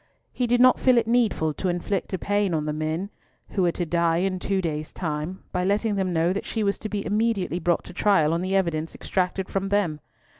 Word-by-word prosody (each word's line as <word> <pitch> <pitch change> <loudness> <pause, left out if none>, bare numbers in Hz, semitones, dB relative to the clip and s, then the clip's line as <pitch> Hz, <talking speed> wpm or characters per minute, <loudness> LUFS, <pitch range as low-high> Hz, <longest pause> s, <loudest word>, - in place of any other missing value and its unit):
He 250 - 0
did 245 +1 +3
not 255 +1 +6
feel 255 -2 +4
it 230 - +3
needful 225 -10 +1
to 185 - -2
inflict 175 +2 -2
a 190 - -1
pang 205 -1 0
on 155 -1 -1
the 150 - -1
men 160 +6 -3 0.4
who 195 - -1
were 175 -1 +3
to 175 - -2
die 170 0 +1
in 185 +1 0
two 195 +1 0
days' 155 -4 -3
time 160 +2 -4
by 180 -1 -1
letting 205 +3 +1
them 190 -2 0
know 170 +1 +2
that 200 - -3
she 220 - -1
was 200 -1 0
to 215 - -5
be 205 -1 -3
immediately 210 -4 0
brought 175 0 +1
to - - -11
trial 175 -5 +3
on 170 - 0
the 190 +1 -1
evidence 165 -4 0
extracted 185 0 -1
from 195 0 -2
them. 190 -7 +1
185 Hz, 230 wpm, -25 LUFS, 170-205 Hz, 0.4 s, not